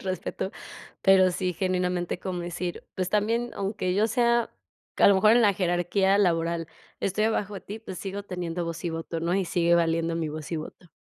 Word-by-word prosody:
respeto, 185 Hz, 0 st, -3 dB, 0.5 s
pero 190 Hz, -1 st, +6 dB
sí, 180 Hz, 0 st, -1 dB
genuinamente 180 Hz, -1 st, -1 dB
como 180 Hz, -2 st, -4 dB
decir: 175 Hz, 0 st, -4 dB
"Pues 185 Hz, -1 st, -1 dB
también, 225 Hz, +4 st, 0 dB
aunque 195 Hz, -2 st, -2 dB
yo 210 Hz, +2 st, +3 dB
sea, 235 Hz, 0 st, +2 dB, 0.4 s
a -, -, +6 dB
lo 200 Hz, -, +6 dB
mejor 215 Hz, +3 st, +5 dB
en 240 Hz, 0 st, +5 dB
la 205 Hz, -2 st, +5 dB
jerarquía 185 Hz, +2 st, +2 dB
laboral, 170 Hz, -3 st, +1 dB, 0.3 s
estoy 205 Hz, +3 st, 0 dB
abajo 210 Hz, -2 st, 0 dB
de -, -, -6 dB
ti, 210 Hz, +3 st, -8 dB
pues 190 Hz, -5 st, -8 dB
sigo 200 Hz, +1 st, -5 dB
teniendo 175 Hz, -2 st, -4 dB
voz 165 Hz, -1 st, -5 dB
y 170 Hz, -, 0 dB
voto, 165 Hz, 0 st, -4 dB
¿no?, 170 Hz, +1 st, -1 dB
y 195 Hz, -1 st, +1 dB
sigue 170 Hz, 0 st, +2 dB
valiendo 165 Hz, 0 st, +1 dB
mi 160 Hz, -2 st, -2 dB
voz 155 Hz, -1 st, -7 dB
y -, -, 0 dB
voto". 160 Hz, +2 st, -9 dB
185 Hz, 195 wpm, -26 LUFS, 170-200 Hz, 0.5 s, pero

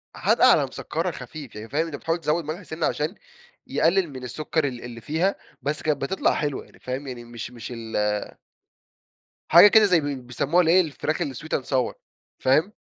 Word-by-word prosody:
حادقة -, -, +4 dB
على -, -, +4 dB
مسكرة -, -, -3 dB
خفيف، 145 Hz, -5 st, -9 dB
يعني 110 Hz, +1 st, -8 dB
فاهم، 155 Hz, +4 st, 0 dB
أنت 160 Hz, -, -6 dB
بتحاول 165 Hz, +4 st, -2 dB
تزود 165 Hz, +1 st, 0 dB
ملح 155 Hz, +5 st, -5 dB
سِنَّة 160 Hz, -1 st, -3 dB
عشان 155 Hz, +6 st, -1 dB, 0.5 s
يقلل 175 Hz, +1 st, +2 dB
من 130 Hz, -2 st, -9 dB
السكر 150 Hz, +4 st, -1 dB
ال 125 Hz, -3 st, -6 dB
اللي 120 Hz, -1 st, -8 dB
فيها، 165 Hz, -, 0 dB, 0.3 s
بس 145 Hz, +3 st, -2 dB
كانت 150 Hz, -3 st, 0 dB
بتطلع 165 Hz, +8 st, +1 dB
حلوة. 145 Hz, -3 st, -2 dB
يعني -, -, -21 dB
فاهم، 130 Hz, +2 st, -5 dB
يعني 125 Hz, -2 st, -6 dB
مش 120 Hz, 0 st, -8 dB
مش 120 Hz, 0 st, -8 dB
ال 105 Hz, -2 st, -2 dB, 1.1 s
حاجة 170 Hz, +5 st, +10 dB
كده 215 Hz, 0 st, +6 dB
زي 180 Hz, -4 st, +4 dB
بي 145 Hz, -2 st, -2 dB
بيسموها 135 Hz, +7 st, +1 dB
الإيه، 175 Hz, +3 st, +5 dB
الفراخ 155 Hz, -1 st, -2 dB
الsweet 145 Hz, +3 st, -2 dB
and -, -, -14 dB
sour 130 Hz, -2 st, 0 dB, 0.5 s
فاهم؟ 155 Hz, +10 st, +3 dB
145 Hz, 180 wpm, -24 LUFS, 125-165 Hz, 1.1 s, حاجة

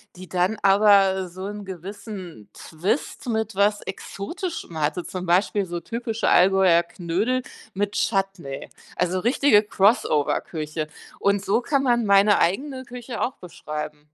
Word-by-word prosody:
die 185 Hz, 0 st, -10 dB
dann 185 Hz, +4 st, 0 dB
aber 195 Hz, -2 st, +5 dB
so 185 Hz, +2 st, -8 dB
'n 205 Hz, 0 st, -6 dB
gewissen 185 Hz, -, -8 dB
Twist 190 Hz, -, -3 dB
mit 220 Hz, -1 st, -1 dB
was 205 Hz, +2 st, +2 dB
Exotischem 200 Hz, -, -6 dB
hatte, 170 Hz, +4 st, 0 dB
zum 185 Hz, -1 st, -6 dB
Beispiel 190 Hz, +2 st, +2 dB
so 175 Hz, 0 st, -4 dB
typische 230 Hz, +4 st, -2 dB
Allgäuer 185 Hz, -2 st, +5 dB
Knödel 190 Hz, +9 st, -2 dB, 0.3 s
mit 200 Hz, +1 st, -1 dB
Chutney, 195 Hz, -11 st, -2 dB, 0.3 s
also 180 Hz, +1 st, 0 dB
richtige 240 Hz, +1 st, +4 dB
Crossover-Küche, 155 Hz, -6 st, 0 dB, 0.3 s
und 200 Hz, 0 st, +1 dB
so 205 Hz, -, +2 dB
kann 275 Hz, +2 st, 0 dB
man 240 Hz, -3 st, +2 dB
meine 200 Hz, +1 st, +5 dB
eigene 260 Hz, -, -1 dB
Küche 245 Hz, -1 st, -7 dB
auch 255 Hz, -, -1 dB
beschreiben. 150 Hz, -3 st, -7 dB
195 Hz, 130 wpm, -24 LUFS, 175-220 Hz, 0.3 s, aber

